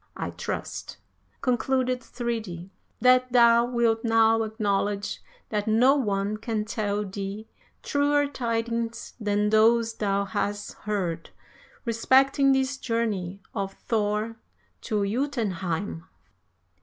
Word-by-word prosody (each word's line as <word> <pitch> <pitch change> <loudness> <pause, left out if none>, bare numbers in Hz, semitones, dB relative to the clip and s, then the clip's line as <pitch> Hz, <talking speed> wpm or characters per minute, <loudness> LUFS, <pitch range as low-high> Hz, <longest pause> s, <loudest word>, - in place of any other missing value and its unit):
I - - -3
trust," - - -5 0.4
concluded 255 0 +1
Thridi, 220 -8 -5 0.3
"that 255 0 +5
thou 235 -1 +6
wilt 235 -2 +1
now 225 -1 +4
acknowledge 205 -2 -1 0.3
that 210 -1 -2
no 235 +5 +5
one 205 -5 0
can 215 -1 -2
tell 210 -2 -2
thee 200 +2 -6 0.4
truer 290 0 +2
tidings 230 -3 -3
than 210 -1 +1
those 225 +1 +4
thou 200 -2 0
hast 205 +1 -3 0.2
heard 175 -6 -2 0.6
respecting 270 +4 +4
this 265 0 +1
journey 205 -7 -2
of 195 -1 -3
Thor 215 0 -1 0.5
to 210 -3 +1
Jotunheim." 200 - -2
225 Hz, 105 wpm, -26 LUFS, 205-240 Hz, 0.6 s, thou